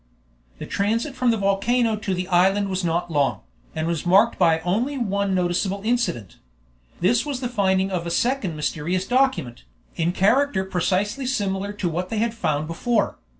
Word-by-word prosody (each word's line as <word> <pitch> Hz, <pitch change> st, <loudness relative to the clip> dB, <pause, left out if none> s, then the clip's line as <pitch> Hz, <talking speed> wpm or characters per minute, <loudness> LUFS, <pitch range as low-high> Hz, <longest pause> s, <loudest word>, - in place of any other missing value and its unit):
The -, -, -7 dB
transit 230 Hz, +7 st, -1 dB
from 255 Hz, -2 st, +1 dB
the 225 Hz, -, +2 dB
volcano 215 Hz, +4 st, +1 dB
to 205 Hz, -3 st, -3 dB
the 180 Hz, 0 st, -3 dB
island 195 Hz, +3 st, +3 dB
was 190 Hz, 0 st, -2 dB
not 170 Hz, 0 st, -1 dB
long, 145 Hz, -3 st, +1 dB, 0.3 s
and 155 Hz, -, -2 dB
was 170 Hz, -2 st, -2 dB
marked 185 Hz, +3 st, +4 dB
by 165 Hz, -3 st, +4 dB
only 225 Hz, -, -1 dB
one 200 Hz, -4 st, 0 dB
noticeable 185 Hz, +2 st, 0 dB
incident. 230 Hz, -, -1 dB, 0.6 s
This 225 Hz, +7 st, +3 dB
was 285 Hz, -4 st, -4 dB
the 250 Hz, -, -2 dB
finding 195 Hz, -4 st, +1 dB
of 175 Hz, -2 st, -2 dB
a -, -, -2 dB
second 225 Hz, -2 st, 0 dB
mysterious 165 Hz, +5 st, -2 dB
document, 245 Hz, -, 0 dB, 0.3 s
in 170 Hz, +1 st, 0 dB
character 205 Hz, +3 st, +2 dB
precisely 195 Hz, +7 st, -1 dB
similar 200 Hz, -5 st, -1 dB
to 205 Hz, -3 st, -2 dB
what 175 Hz, +2 st, -3 dB
they 225 Hz, -, -3 dB
had 225 Hz, +1 st, 0 dB
found 155 Hz, -9 st, -1 dB
before. 210 Hz, +7 st, -1 dB
195 Hz, 170 wpm, -23 LUFS, 175-230 Hz, 0.6 s, marked